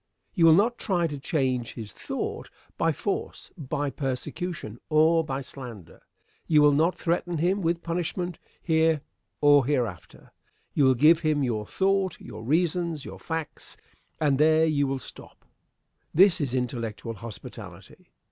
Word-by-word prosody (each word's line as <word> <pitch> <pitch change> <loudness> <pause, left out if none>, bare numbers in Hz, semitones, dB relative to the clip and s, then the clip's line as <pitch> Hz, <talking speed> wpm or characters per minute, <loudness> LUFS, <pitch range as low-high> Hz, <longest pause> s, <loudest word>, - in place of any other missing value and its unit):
You 165 -4 +4
will 160 - +8
not 230 +6 +2
try 180 -4 0
to 145 -3 -4
change 130 -5 -1
his 110 -4 -7
thought - - -5 0.3
by 165 - +1
force, 195 +6 -4
by 145 -3 -3
persecution, 135 - -4
or 160 +1 +4
by 135 -3 -3
slander. 120 - -10 0.5
You 150 -2 +5
will 145 - +6
not 160 +5 +2
threaten 175 0 -1
him 180 +6 +1
with 170 0 -1
punishment 175 +1 -3 0.2
here 160 -2 +2 0.4
or 145 -1 +6
hereafter. 120 - -3 0.4
You 140 - +3
will 130 -1 +5
give 155 +6 +6
him 155 -3 +1
your 110 -4 -2
thought, 195 -1 0
your 110 +1 -9
reasons, 165 +2 0
your - - -9
facts; 160 -3 -6 0.4
and 145 -3 +2
there 155 +1 +5
you 145 -3 +1
will 135 0 -1
stop. 130 - -12 0.7
This 185 0 +5
is 130 -3 -1
intellectual 115 -2 -3
hospitality. 110 0 -10
155 Hz, 145 wpm, -26 LUFS, 130-170 Hz, 0.7 s, will